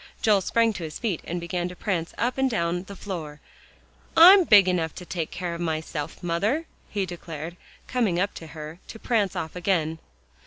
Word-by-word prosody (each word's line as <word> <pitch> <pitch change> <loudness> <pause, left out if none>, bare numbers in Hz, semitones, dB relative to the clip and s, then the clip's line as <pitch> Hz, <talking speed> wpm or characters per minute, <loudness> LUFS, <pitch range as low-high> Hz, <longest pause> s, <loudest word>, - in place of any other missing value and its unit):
Joel 210 -3 +4
sprang 230 +4 +2
to 190 - -6
his 155 -1 -6
feet 205 -9 -2
and 175 +1 -3
began 175 +1 -2
to 180 - -9
prance 175 -4 -2
up 250 +3 -1
and 265 0 +3
down 175 -5 -1
the 200 - -9
floor. 165 -7 -6 0.8
"I'm 365 +3 +10
big 205 - +7
enough 170 -4 0
to 180 - -8
take 170 -3 -3
care 180 -1 -4
of 170 - -5
myself, 160 -2 -3
mother," 205 - 0 0.2
he 200 -2 -1
declared, 170 -2 -7 0.3
coming 220 -9 0
up 200 +2 0
to 165 - -9
her, 155 +2 -9
to - - -9
prance 215 -5 0
off 160 +1 -4
again. 165 -3 0
180 Hz, 190 wpm, -25 LUFS, 165-210 Hz, 0.8 s, I'm